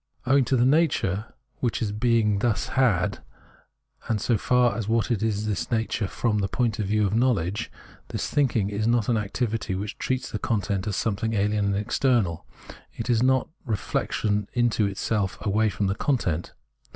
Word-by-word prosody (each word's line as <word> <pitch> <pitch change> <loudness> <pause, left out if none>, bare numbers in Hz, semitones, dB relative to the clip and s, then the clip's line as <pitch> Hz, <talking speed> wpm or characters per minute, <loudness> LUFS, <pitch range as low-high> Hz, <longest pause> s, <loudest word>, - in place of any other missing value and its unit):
Owing 135 +1 +4
to 130 - +1
the 120 - +4
nature 130 - +1 0.3
which 120 -2 -1 0.2
being 110 -4 +2
thus 110 0 0
has, 115 -10 +1 0.9
and 110 -2 0
so 115 +3 +1
far 120 +1 +2
as 110 -2 -3
what 115 +1 +1
is 115 - 0
has 110 -1 0
this 105 -5 -2
nature 110 -3 -1
from 105 +1 0
the 100 - 0
point 115 +1 -1
of 105 - -1
view 105 +1 +2
of 100 - -1
knowledge, 110 -4 0 0.4
this - - -3
thinking 120 -8 +1
is 105 +2 -1
not 115 -1 +2
an 115 - +3
activity 105 -1 -2
which 105 +3 -5
treats 130 -1 -2
the 105 - -3
content 100 -3 -1
as 100 - -1
something 110 +1 -1
alien 105 0 +1
and 100 0 +1
external; 105 -4 0 0.5
it 115 +2 -3
is 115 -1 +3
not 130 0 +2
reflection 105 -2 -1
into 115 -4 +2
self 100 -2 -1
away 110 +2 +2
from 100 - -2
the 95 - +1
content. 95 - -1
110 Hz, 175 wpm, -25 LUFS, 100-120 Hz, 0.9 s, Owing